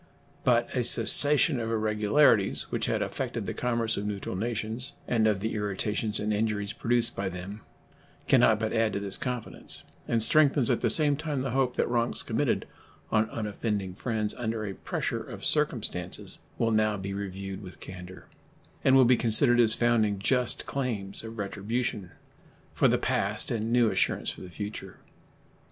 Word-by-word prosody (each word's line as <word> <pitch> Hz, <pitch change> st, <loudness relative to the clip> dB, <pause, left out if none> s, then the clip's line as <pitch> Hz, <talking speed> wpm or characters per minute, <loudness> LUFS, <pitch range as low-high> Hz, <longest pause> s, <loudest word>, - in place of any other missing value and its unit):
But 120 Hz, -1 st, +3 dB
a 125 Hz, -, +1 dB
cessation 145 Hz, +2 st, +5 dB
of 115 Hz, -1 st, -3 dB
irregularities 110 Hz, 0 st, +2 dB
which -, -, -2 dB
had -, -, 0 dB
affected -, -, -4 dB
the -, -, -4 dB
commerce 115 Hz, -2 st, -1 dB
of 100 Hz, -, -3 dB
neutral 100 Hz, -2 st, -4 dB
nations 115 Hz, +4 st, -4 dB
and 110 Hz, -2 st, +2 dB
of 105 Hz, -3 st, 0 dB
the 110 Hz, -, -2 dB
irritations 105 Hz, +1 st, -2 dB
and 105 Hz, +1 st, -1 dB
injuries 105 Hz, -1 st, -1 dB
produced 120 Hz, 0 st, +1 dB
by 95 Hz, -1 st, -2 dB
them 95 Hz, +4 st, -8 dB, 0.7 s
can -, -, +5 dB
not 110 Hz, -1 st, +4 dB
but 110 Hz, 0 st, -2 dB
add 110 Hz, -1 st, +1 dB
to -, -, -2 dB
this 100 Hz, -1 st, -2 dB
confidence, 125 Hz, -3 st, -4 dB, 0.2 s
and 115 Hz, -2 st, +2 dB
strengthens 145 Hz, -3 st, +4 dB
at -, -, 0 dB
the -, -, +1 dB
same 150 Hz, -3 st, +7 dB
time 150 Hz, -4 st, -3 dB
the 135 Hz, -, -3 dB
hope 130 Hz, -1 st, 0 dB
that -, -, 0 dB
wrongs 120 Hz, 0 st, 0 dB
committed -, -, -1 dB, 0.5 s
on 110 Hz, 0 st, +2 dB
unoffending 105 Hz, -3 st, -3 dB
friends 110 Hz, +1 st, -3 dB
under 110 Hz, -2 st, -3 dB
a 100 Hz, -, -5 dB
pressure -, -, -3 dB
of -, -, -8 dB
circumstances -, -, -1 dB, 0.2 s
will 115 Hz, -, +1 dB
now 110 Hz, -1 st, +1 dB
be 100 Hz, 0 st, -5 dB
reviewed 95 Hz, 0 st, -6 dB
with 90 Hz, -2 st, -11 dB
candor, 95 Hz, 0 st, -10 dB, 0.6 s
and 130 Hz, -, +5 dB
will 130 Hz, -1 st, +6 dB
be 125 Hz, +1 st, +5 dB
considered 120 Hz, +1 st, +3 dB
as 110 Hz, -2 st, +4 dB
founding 115 Hz, -4 st, +1 dB
just 125 Hz, +4 st, 0 dB
claims 110 Hz, -9 st, -2 dB
of 115 Hz, 0 st, -9 dB
retribution 105 Hz, 0 st, -3 dB, 0.6 s
for -, -, +3 dB
the -, -, +2 dB
past -, -, -1 dB
and 115 Hz, 0 st, -2 dB
new 120 Hz, -2 st, +3 dB
assurance -, -, 0 dB
for -, -, -12 dB
the 90 Hz, -, -9 dB
future. 105 Hz, +4 st, -7 dB
110 Hz, 170 wpm, -27 LUFS, 100-120 Hz, 0.7 s, same